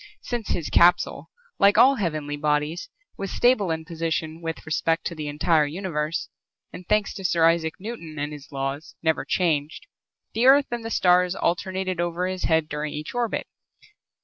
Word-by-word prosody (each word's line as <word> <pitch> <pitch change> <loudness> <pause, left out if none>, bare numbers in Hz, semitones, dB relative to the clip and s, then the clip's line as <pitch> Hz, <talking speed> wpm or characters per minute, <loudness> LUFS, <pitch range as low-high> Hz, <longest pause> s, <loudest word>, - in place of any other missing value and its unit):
Since 240 -4 -4
his 165 - -2
capsule, 175 +1 +3 0.3
like 200 +1 +5
all 270 +1 +6
heavenly 155 -7 -2
bodies, 150 +2 -1 0.3
was 195 - -3
stable 240 -5 +2
in 160 0 -2
position 165 -1 -3
with 165 -1 -5
respect 165 +1 0
to - - -2
the 155 -2 -5
entire 150 +1 +2
universe 160 -1 -3 0.5
and, 180 - -10
thanks 210 -1 +2
to 195 - -8
Sir 170 -3 +3
Isaac 165 -1 +1
Newton 185 -7 -8
and 145 +1 -3
his 150 0 -11
laws, 135 +2 -4
never 160 -1 +1
changed, 155 -4 0 0.5
the 235 +3 +2
Earth 280 +1 +7
and 240 -1 -3
the 225 - -4
stars 180 -3 +3
alternated 185 0 -1
over 175 +1 -1
his 185 0 -3
head 160 -1 +2
during 150 -1 -4
each 150 +1 -6
orbit. 240 -2 -1
165 Hz, 170 wpm, -24 LUFS, 155-190 Hz, 0.5 s, Earth